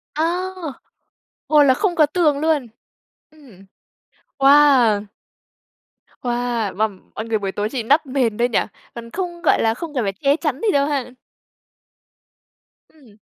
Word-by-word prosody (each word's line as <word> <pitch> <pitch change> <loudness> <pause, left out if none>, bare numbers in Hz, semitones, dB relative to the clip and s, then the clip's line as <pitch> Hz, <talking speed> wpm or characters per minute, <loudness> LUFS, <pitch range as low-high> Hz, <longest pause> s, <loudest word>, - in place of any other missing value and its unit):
A. 310 - 0 1.2
Ồ, 300 -1 +5
là 265 -2 +5
không 360 +2 -1
có 310 - +5
tường 300 -2 +1
luôn. 305 -5 0 0.6
Ừm. 245 -11 -18 0.7
Wow! 270 -7 +5 1.2
Wow, 240 -4 -2
mà 220 +3 +2 0.3
mọi 220 - -5
người 225 -1 0
buổi 195 -1 -3
tối 210 +2 -3
chỉ 245 -1 -4
đắp 290 +7 +2
mền 255 -5 -1
thôi 240 +1 +1
nhỉ, 230 - +2 0.4
còn 230 0 -9
không, 345 0 -5
gọi 330 - +2
là, 225 0 +2
không 310 +4 -7
cần 245 -6 -1
phải 195 - -2
che 275 +8 +1
chắn 300 -4 -3
gì 435 -3 +2
đâu 280 0 +2
ha? 275 -4 -2 1.8
Ừm. 250 -9 -21
265 Hz, 150 wpm, -20 LUFS, 230-300 Hz, 1.8 s, Ồ